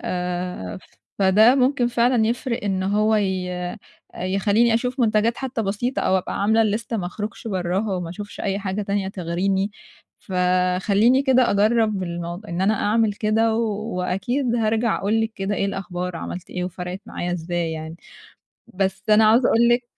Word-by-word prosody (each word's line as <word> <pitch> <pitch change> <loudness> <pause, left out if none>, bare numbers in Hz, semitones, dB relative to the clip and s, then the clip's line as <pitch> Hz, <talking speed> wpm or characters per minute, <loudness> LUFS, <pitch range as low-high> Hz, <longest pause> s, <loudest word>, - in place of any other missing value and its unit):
آآ 180 - -4 0.4
فده 210 +6 +5
ممكن 260 -1 +2
فعلًا 240 -1 +2
يفرق 235 -1 -2
إن 190 -2 0
هو 210 +3 +2
ي 190 -3 -1 0.7
يخلّيني 205 +5 +2
أشوف 250 +3 -1
منتجات 225 0 +2
حتّى 260 -4 -3
بسيطة 215 +6 -2
أو 190 - +2
أبقى 185 - -4
عاملة 220 +2 +4 0.2
الlist 230 - -12
ما 185 -5 -2
أخرُجش 210 +4 -6
برّاها 190 +2 -1
وما 170 -2 -4
أشوفش 205 +3 -8
أي 195 0 -1
حاجة 200 +1 -3
تانية 200 -1 -1
تغريني، 190 +2 -1 0.5
فخلّيني 185 +7 +2
كده 255 -2 +3
أجرّب 215 -1 +2
الموض 175 +3 -5
إن 170 0 -4
أنا 210 +3 +3
أعمل 215 +1 +1
كده 220 +2 +1
و 230 - +1 0.4
وأكيد 240 +8 -1
هارجع 225 0 +1
أقول 215 +3 +1
لِك 225 0 -1
كده 195 +1 -2
إيه 195 - -1
الأخبار 180 -2 -4
عملت 175 +1 -7
إيه 180 -1 -3
وفرقِت 180 +1 -6
معايا 175 0 -4
إزاي 170 -1 -2
يعني. 160 +1 -6 0.8
بس 190 0 -1
أنا 215 +1 +6
عاوزة 230 +3 +5
أقول 235 +1 +4
لِك 240 +1 +2
200 Hz, 160 wpm, -22 LUFS, 180-225 Hz, 0.8 s, أنا